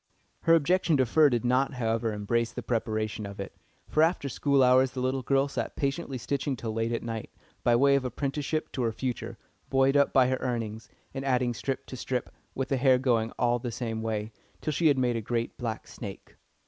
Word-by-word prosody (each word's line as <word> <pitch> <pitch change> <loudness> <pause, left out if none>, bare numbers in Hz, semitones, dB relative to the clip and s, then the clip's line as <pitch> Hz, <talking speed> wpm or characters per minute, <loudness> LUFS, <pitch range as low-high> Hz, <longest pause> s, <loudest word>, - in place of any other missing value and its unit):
Her 165 - +5
objection 165 0 +3
to 130 - +3
fur 150 +5 +5
did 120 -1 -1
not, 130 +3 +2
however, 115 -1 0
embrace 115 +3 -1
the - - -6
preparation 110 -2 -2
of 100 0 -10
it, 100 - -6 0.3
for 155 - +2
after 160 -3 +2
school 140 +1 +2
hours 130 +1 +5
the 130 - -4
little 130 +1 0
girl 135 +2 +2
sat 140 - -4
patiently 140 0 -2
stitching 140 +2 -2
till 115 -2 -4
late 115 +1 -1
at 115 - -2
night, 115 -2 -5 0.3
by 120 - +4
way 140 +3 +5
of 140 -1 +2
apprenticeship 140 +4 -2
to 130 - -3
her 115 -2 +1
future, 125 +2 -4 0.3
buoyed 135 +1 +3
up 140 0 +4
by 130 -2 +5
her 130 - +1
earnings, 115 -3 -4 0.2
and 135 0 -4
adding 125 -2 +1
strip 135 +3 -3
to - - -8
strip, 125 0 -3 0.2
with 135 0 -2
the 135 - +1
hair 130 0 +5
going 120 -3 +1
all 120 0 +2
the 120 - -4
same 115 -1 -3
way, 110 -1 -2 0.3
till 155 - -2
she 160 +3 +3
had 145 -3 +4
made 125 -2 +1
a - - -2
great 115 +2 -2
black 115 -2 -3
snake. 100 -4 -9
125 Hz, 210 wpm, -28 LUFS, 115-135 Hz, 0.3 s, Her